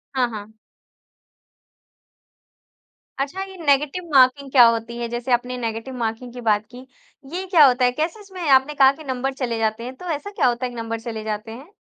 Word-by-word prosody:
हाँ, 250 -2 +2
हाँ। 215 -1 -8 2.7
अच्छा 290 +8 -3
ये 385 0 -10
नेगेटिव 290 +5 +2
मार्किंग 270 +1 +4
क्या 250 -3 +8
होती 230 +1 -1
है? 235 0 -3
जैसे 240 +2 -4
आपने 250 +1 0
नेगेटिव 230 +2 -4
मार्किंग 235 +1 -4
की 245 - -8
बात 215 -2 +1
की। 250 +1 -11 0.5
ये 370 +2 -3
क्या 335 -6 +7
होता 250 -1 +3
है? 245 - +3
कैसे 315 - -3
इसमें 385 -3 -10
आपने 265 +2 +4
कहा 270 -1 +6
कि 310 +3 -12
नंबर 265 0 -2
चले 245 -4 -3
जाते 220 +1 -1
हैं 255 +2 -7
तो 360 - -12
ऐसा 405 +8 -8
क्या 330 - +1
होता 245 +1 0
है - - -3
कि 245 - -11
नंबर 230 -1 -4
चले 225 -2 -6
जाते 215 +1 -4
हैं? 275 - -11
250 Hz, 195 wpm, -22 LUFS, 230-280 Hz, 2.7 s, क्या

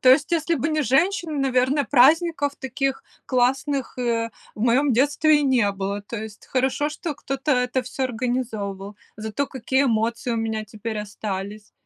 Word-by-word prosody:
То 255 - +6
есть, 285 +5 +4
если 335 0 +1
бы 295 +2 -1
не 310 -1 +1
женщины, 325 - +1
наверно, 270 +1 +2
праздников 290 +2 +4
таких 270 +1 -2 0.2
классных, 270 +2 0
э, 230 -2 0 0.2
в 210 - -10
моем 255 +3 +3
детстве 295 +4 +3
и - - 0
не 250 -7 +3
было. 195 +1 -3
То 230 +3 -7
есть, 215 -1 -10
хорошо, 265 +3 0
что 305 0 -5
кто-то 275 +2 -3
это 250 0 +1
всё 265 - -3
организовывал, 220 -5 -3 0.2
зато 220 +6 -2
какие 265 +1 0
эмоции 230 0 0
у - - -1
меня 220 -1 -2
теперь 215 +1 -5
остались. 205 0 -5
255 Hz, 160 wpm, -23 LUFS, 220-285 Hz, 0.2 s, То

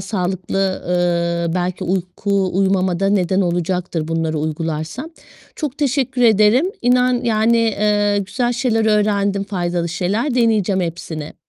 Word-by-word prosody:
sağlıklı, 190 0 -2
ııı, 170 -1 0
belki 180 0 -2
uyku 190 +2 -1
uyumama 190 -2 +1
da 195 - +2
neden 190 -1 +1
olacaktır 175 -2 -1
bunları 165 -1 -1
uygularsam. 160 - -4 0.5
Çok 295 -4 -4
teşekkür 265 -3 0
ederim. 225 - +4 0.2
İnan 250 0 +3
yani, 230 0 +2
eee, 210 -2 +1
güzel 240 +5 -1
şeyler 235 -2 0
öğrendim. 205 -2 +1
Faydalı 175 -3 -2
şeyler. 205 - -1
Deneyeceğim 215 -5 +2
hepsini. 165 -3 -5
195 Hz, 120 wpm, -19 LUFS, 175-225 Hz, 0.5 s, ederim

